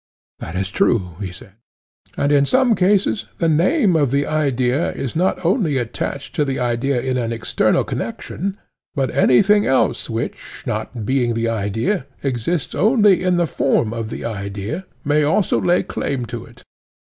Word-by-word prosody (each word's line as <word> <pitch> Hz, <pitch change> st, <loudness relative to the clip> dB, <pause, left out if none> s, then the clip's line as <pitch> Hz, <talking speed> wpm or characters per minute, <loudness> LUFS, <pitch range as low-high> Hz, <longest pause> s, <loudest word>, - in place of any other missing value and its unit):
That 85 Hz, -, -7 dB
is 95 Hz, 0 st, -1 dB
true, 95 Hz, -4 st, +1 dB
he 95 Hz, -4 st, -4 dB
said. 100 Hz, +4 st, -13 dB, 0.7 s
And 140 Hz, -, +1 dB
in 140 Hz, -1 st, +4 dB
some 260 Hz, -, +3 dB
cases 200 Hz, +1 st, +2 dB
the 165 Hz, -, +1 dB
name 180 Hz, -, +3 dB
of 145 Hz, -4 st, +3 dB
the 140 Hz, +2 st, +1 dB
idea 140 Hz, -2 st, 0 dB
is 130 Hz, -, -5 dB
not 180 Hz, +1 st, 0 dB
only 175 Hz, -, +2 dB
attached 130 Hz, +3 st, -4 dB
to 150 Hz, -, +1 dB
the 135 Hz, -2 st, -2 dB
idea 125 Hz, +2 st, 0 dB
in 130 Hz, +1 st, -1 dB
an 115 Hz, -1 st, -2 dB
eternal 115 Hz, -1 st, +1 dB
connection, 195 Hz, +3 st, -4 dB, 0.4 s
but 135 Hz, -3 st, 0 dB
anything 205 Hz, +10 st, +4 dB
else 130 Hz, 0 st, +1 dB
which, 115 Hz, 0 st, -5 dB
not 110 Hz, -3 st, -4 dB
being 125 Hz, -2 st, +1 dB
the 115 Hz, 0 st, 0 dB
idea, 115 Hz, -, -1 dB, 0.2 s
exists 135 Hz, +5 st, -1 dB
only 210 Hz, -3 st, +4 dB
in 180 Hz, -1 st, +2 dB
the 175 Hz, -, +3 dB
form 120 Hz, -7 st, +1 dB
of 115 Hz, -2 st, -4 dB
the -, -, -6 dB
idea, 105 Hz, -, -4 dB, 0.2 s
may 150 Hz, +1 st, +3 dB
also 160 Hz, +7 st, +2 dB
lay 175 Hz, -, +2 dB
claim 130 Hz, -3 st, -3 dB
to 115 Hz, -1 st, -5 dB
it. 120 Hz, +2 st, -17 dB
135 Hz, 165 wpm, -20 LUFS, 115-175 Hz, 0.7 s, in